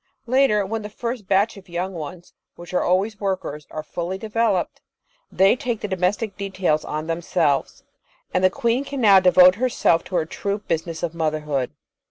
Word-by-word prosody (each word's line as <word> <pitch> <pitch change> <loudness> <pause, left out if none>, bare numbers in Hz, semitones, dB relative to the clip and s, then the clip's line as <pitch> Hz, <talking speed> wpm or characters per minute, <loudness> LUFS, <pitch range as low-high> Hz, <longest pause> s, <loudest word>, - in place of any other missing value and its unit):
Later, 245 -5 +3
when 220 +3 -3
the 210 - -7
first 235 -1 -5
batch 200 +3 +2
of 190 -1 -14
young 180 +2 -3
ones, 170 +1 -8 0.2
which 175 +1 -11
are 180 - +2
always 200 +4 0
workers, 185 -7 -3
are 155 - -6
fully 175 +4 -4
developed, 215 -2 -1 0.5
they 195 +3 +4
take 240 -3 -3
the - - -2
domestic 195 +3 -1
details 190 -6 0
on 155 +1 -4
themselves, 165 -2 -1 0.5
and 185 - +1
the 185 - +6
queen 235 +4 0
can 280 -1 -5
now 200 -5 +7
devote 180 0 +7
herself 230 -9 +2
to 185 - -6
her 165 -3 +1
true 200 +5 -3
business 165 -4 -3
of 170 -1 -2
motherhood. 150 -5 -1
190 Hz, 175 wpm, -22 LUFS, 170-210 Hz, 0.5 s, now